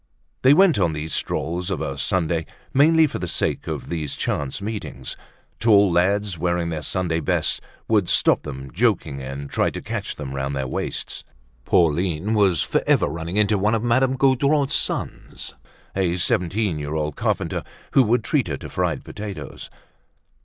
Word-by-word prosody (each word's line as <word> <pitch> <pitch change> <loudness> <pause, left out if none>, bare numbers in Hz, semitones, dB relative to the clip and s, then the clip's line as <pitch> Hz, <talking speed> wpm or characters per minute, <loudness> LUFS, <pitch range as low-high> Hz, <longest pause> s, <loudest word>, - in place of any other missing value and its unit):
They 135 +3 +6
went 185 - +5
on 85 -4 +2
these 75 +1 -4
strolls 90 +3 -2
of - - -2
a - - -3
Sunday 85 -3 0 0.3
mainly 160 +4 +6
for 150 - -3
the - - -3
sake - - -1
of - - -4
these 80 -5 -3
chance 70 +3 -2
meetings. 105 +1 -5 0.4
Tall 100 -4 +5
lads, 95 +1 +1
wearing 85 0 0
their 80 -2 -3
Sunday 85 -1 0
best, 80 - 0 0.3
would 105 -5 +2
stop - - +4
them, 70 -2 -7
joking 85 - +1
and 70 +2 -6
trying - - 0
to - - -5
catch - - -4
them 70 -3 -6
round 70 +1 -2
their 65 -1 -2
waists. - - -3 0.4
Pauline 85 +4 +2
was 100 -7 +3
forever - - +2
running 85 +3 -4
into 105 -1 +3
one 105 +3 +2
of 110 - -1
Madame 130 +2 +2
Gaudron's 140 +2 +3
sons, - - -2 0.4
a 90 -2 +1
seventeen 90 0 +1
year 75 +1 -4
old 75 -1 -2
carpenter, - - -1 0.3
who 135 - +6
would 120 -1 +2
treat 140 -3 +1
her 75 -4 -3
to - - -9
fried 90 -5 -1
potatoes. 105 -2 -7
90 Hz, 165 wpm, -23 LUFS, 80-110 Hz, 0.4 s, They